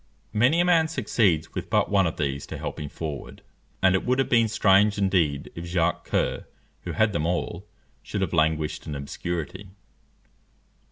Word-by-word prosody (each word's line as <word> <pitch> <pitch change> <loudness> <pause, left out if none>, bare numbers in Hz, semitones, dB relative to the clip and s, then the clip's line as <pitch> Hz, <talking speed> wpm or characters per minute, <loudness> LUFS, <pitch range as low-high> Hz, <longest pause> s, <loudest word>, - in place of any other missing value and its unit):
Many 125 +10 +3
a - - +2
man 165 -3 +4
succeeds 105 - +1
with - - -5
but - - +1
one 100 -3 +4
of 80 - -4
these 70 -3 -2
to - - -6
help - - -5
him 75 - -5
forward; 75 -3 -7 0.4
and 95 -1 +5
it 95 - +1
would 125 +1 +1
have 135 - +1
been 115 -2 +4
strange 105 -1 +4
indeed 90 -8 +1
if 85 - -7
Jacques 85 -1 0
Coeur, - - -1 0.4
who - - -3
had 110 -2 +2
them 75 -2 0
all, 90 +2 -3 0.3
should 100 - -4
have 95 -3 -1
languished 80 -1 0
in 75 - -4
obscurity. 85 +6 -5
95 Hz, 175 wpm, -25 LUFS, 80-105 Hz, 0.4 s, and